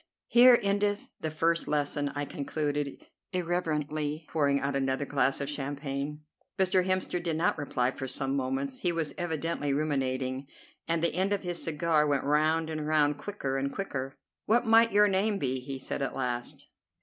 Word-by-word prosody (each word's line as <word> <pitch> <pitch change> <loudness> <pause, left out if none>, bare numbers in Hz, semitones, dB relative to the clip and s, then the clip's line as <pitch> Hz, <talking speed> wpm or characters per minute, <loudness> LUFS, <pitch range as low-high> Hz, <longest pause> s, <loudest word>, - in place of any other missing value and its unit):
'Here 245 0 +8
endeth 205 +1 0
the 155 - -2
first 165 +2 0
lesson,'" 145 -1 0
I 145 0 -1
concluded 145 0 -3 0.3
irreverently, 155 -3 -1
pouring 140 -3 +2
out 140 0 -2
another 135 +1 0
glass 140 -1 +1
of 140 - -3
champagne. 145 +1 -4 0.4
Mr. 185 -1 +3
Hemster 185 -1 0
did 170 -2 -1
not 165 - +2
reply 130 -4 0
for 135 -1 -6
some 135 +1 -1
moments. 135 0 -2
He 175 - +2
was 165 -3 -2
evidently 165 -4 -2
ruminating, 135 -2 -1 0.4
and 165 0 0
the 170 - +2
end 190 +3 +1
of 200 - -2
his 175 -1 -3
cigar 155 -1 +2
went 140 -2 +1
round 155 +3 +2
and 155 -1 -3
round 150 -2 +2
quicker 145 -7 -3
and 140 +1 -1
quicker. 135 -9 -4 0.3
"What 240 +3 +3
might 225 +1 +6
your 210 +1 +5
name 200 +2 +1
be?" 130 -5 -1
he 135 +1 -6
said 130 - -4
at 135 - -2
last. 125 -2 -3
150 Hz, 170 wpm, -29 LUFS, 140-175 Hz, 0.4 s, Here